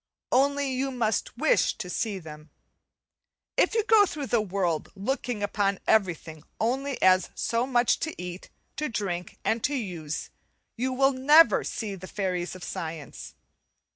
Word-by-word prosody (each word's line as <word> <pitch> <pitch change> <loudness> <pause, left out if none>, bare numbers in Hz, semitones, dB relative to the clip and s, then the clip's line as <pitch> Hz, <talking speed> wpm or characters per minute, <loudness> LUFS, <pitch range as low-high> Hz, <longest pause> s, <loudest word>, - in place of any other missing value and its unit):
Only 280 +1 +2
you 265 +2 -1
must 230 -4 -1
with - - +2
to 210 - -5
see 205 +3 -2
them. 155 -3 -11 1.1
If - - +2
you 445 - +3
go 425 -2 +5
through 295 -4 -4
the 235 - +4
world 180 -5 -1
looking 225 +1 -2
upon 200 -1 0
everything 175 -7 +1 0.2
only 265 +4 -1
as 185 -1 +5
so 235 +2 0
much 245 -2 +2
to 315 - -4
eat, 180 +1 -7 0.3
to 300 +1 -1
drink, 185 -6 -3
and 225 0 0
to 290 - +1
use, 170 - -4 0.4
you 255 +3 -1
will 270 +1 +3
never 295 +5 +6
see 215 -3 -4
the 185 -1 -8
fairies 185 -3 -2
of 185 - -10
science. 160 -5 -6
215 Hz, 150 wpm, -27 LUFS, 180-265 Hz, 1.1 s, never